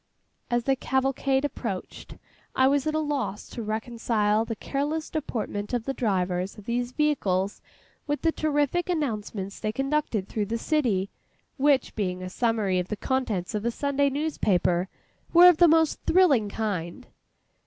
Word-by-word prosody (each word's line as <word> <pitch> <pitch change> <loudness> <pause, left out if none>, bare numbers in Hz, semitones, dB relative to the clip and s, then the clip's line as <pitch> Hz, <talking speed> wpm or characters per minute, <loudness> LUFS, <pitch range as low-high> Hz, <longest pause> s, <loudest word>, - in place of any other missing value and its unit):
As 240 0 +1
the 270 +2 +2
cavalcade 265 +1 0
approached, 290 - -5 0.4
I 260 - +5
was 280 +2 +2
at 310 - 0
a - - +2
loss 290 -9 -2
to 235 - -6
reconcile 220 -1 0
the 225 - -4
careless 295 +6 -3
deportment 225 -7 -3
of 235 -2 -3
the 270 - -1
drivers 185 -5 -1
of 210 - -12
these 240 +1 -1
vehicles, 205 -11 0 0.5
with 290 0 -2
the 325 - +3
terrific 310 +3 0
announcements 215 - -3
they 215 - -1
conducted 270 -5 -1
through 210 -2 -2
the 230 +2 -1
city, 230 - 0 0.5
which 280 -1 +2
being 185 -3 -2
a 185 - -6
summary 215 -5 +1
of 180 - -3
the 210 - -4
contents 225 -10 -1
of 210 -1 -2
a 235 - +1
Sunday 280 +3 +1
newspaper, 195 - 0 0.4
were 345 +1 +9
of 355 -3 +7
the 345 - +7
most 320 -1 +3
thrilling 290 - +4
kind. 200 0 -3
240 Hz, 155 wpm, -26 LUFS, 205-290 Hz, 0.5 s, were